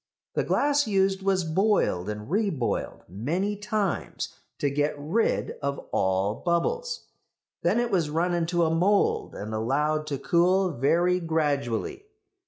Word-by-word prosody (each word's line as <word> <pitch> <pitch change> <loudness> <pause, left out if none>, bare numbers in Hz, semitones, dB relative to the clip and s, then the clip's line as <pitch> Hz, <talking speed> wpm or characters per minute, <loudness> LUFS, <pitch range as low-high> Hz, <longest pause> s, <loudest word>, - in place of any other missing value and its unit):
The - - +1
glass 290 -2 +2
used 195 -1 +2
was 190 -1 +1
boiled 160 - +1
and 105 0 -5
reboiled 185 - -1
many 165 - -2
times 205 -2 -2 0.2
to 145 - 0
get 145 +2 0
rid 165 +11 0
of 140 0 -1
all 95 +2 +1
bubbles. 465 - -1 0.6
Then 185 +7 +2
it 240 -1 0
was 170 -6 +1
run 170 +4 0
into 170 0 +1
a 160 - +1
mould 195 +5 +2
and 105 +2 -5
allowed 150 +7 0
to 140 -2 -2
cool 180 +5 +2
very 170 +7 +2
gradually. 160 - -1
170 Hz, 135 wpm, -26 LUFS, 140-195 Hz, 0.6 s, glass